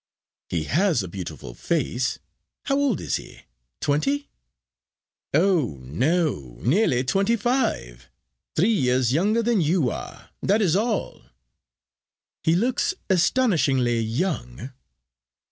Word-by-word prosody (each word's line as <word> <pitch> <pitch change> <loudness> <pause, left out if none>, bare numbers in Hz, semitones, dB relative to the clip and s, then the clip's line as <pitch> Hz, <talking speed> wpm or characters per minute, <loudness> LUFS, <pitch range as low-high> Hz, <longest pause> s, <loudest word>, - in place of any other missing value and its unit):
"He 85 -3 -1
has 160 - +1
a - - -5
beautiful 85 -9 -7
face. 130 - -1 0.5
How 275 - 0
old 275 - +1
is 75 - -1
he? - - -12 0.4
Twenty?" 275 - 0 1.0
"Oh 160 - +2
no, 120 - -1
nearly 135 - +2
twenty 195 - +2
five. 215 - -1 0.5
Three 200 +8 +3
years 125 - +2
younger 210 +9 +2
than 230 -4 +2
you 155 -4 +2
are. - - -8
That 205 +3 +2
is 185 -6 +2
all." 215 -1 -1 1.2
"He 160 - +2
looks 250 - +1 0.2
astonishingly 155 - +2
young." 115 - -3
160 Hz, 110 wpm, -24 LUFS, -, 1.2 s, Three